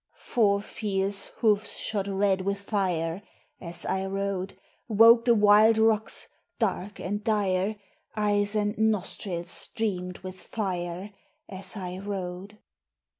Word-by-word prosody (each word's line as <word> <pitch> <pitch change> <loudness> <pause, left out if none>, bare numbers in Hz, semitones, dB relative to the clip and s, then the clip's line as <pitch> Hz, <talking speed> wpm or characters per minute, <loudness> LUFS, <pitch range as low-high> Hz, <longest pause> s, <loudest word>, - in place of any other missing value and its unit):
Four 200 -4 +2
fierce 200 -1 -1
hoofs 215 -2 0
shod 200 -2 -2
red 195 -1 +1
with 200 +1 -1
fire, 185 -4 -1 0.4
As 170 -1 -5
I 190 0 -1
rode, 195 -1 -3 0.3
Woke 230 +1 +7
the 235 -1 +5
wild 210 +1 +6
rocks, 220 0 +1 0.3
dark 200 +2 -2
and 205 +3 -3
dire; 205 -2 +1 0.4
Eyes 205 0 +1
and 210 0 0
nostrils 190 -4 -1
streamed 180 -5 -3
with 185 0 -7
fire, 185 -2 -4 0.4
As 195 +2 -3
I 185 -1 -5
rode. 195 0 -5
200 Hz, 120 wpm, -27 LUFS, 185-210 Hz, 0.4 s, Woke